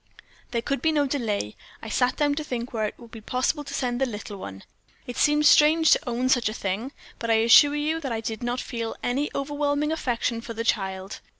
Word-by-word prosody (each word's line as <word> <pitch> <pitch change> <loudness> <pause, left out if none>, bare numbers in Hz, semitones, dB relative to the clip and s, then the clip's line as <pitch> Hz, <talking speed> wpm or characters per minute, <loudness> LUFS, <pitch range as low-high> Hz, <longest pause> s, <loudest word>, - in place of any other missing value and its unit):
"There 235 -1 -2
could 275 +1 -2
be 320 - +2
no 295 -2 +2
delay. 220 - -2 0.3
I - - -6
sat 250 +3 +1
down 290 -1 +1
to 305 +2 -3
think 245 -4 -5
where 220 -2 0
it - - -9
would 235 -2 -14
be 225 - -10
possible 255 +6 -1
to 275 - -9
send 250 -2 -2
the 270 - +2
little 210 -2 -7
one. 95 - -9 0.4
It 245 - -7
seems 295 +2 +3
strange 315 +2 +6
to - - +3
own 245 +2 -1
such 245 -4 +3
a 215 - -6
thing, 205 +7 -3 0.3
but 230 - -4
I 225 - +5
assure 290 +5 +7
you 305 +2 -1
that 275 -5 -4
I 225 - -1
did 220 -1 -5
not 240 +1 -2
feel 230 -2 -4
any 270 +4 0
overwhelming 290 +1 -1
affection 240 -6 -1
for 230 0 -8
the 230 - -2
child. 190 -3 -2
245 Hz, 225 wpm, -25 LUFS, 225-290 Hz, 0.4 s, assure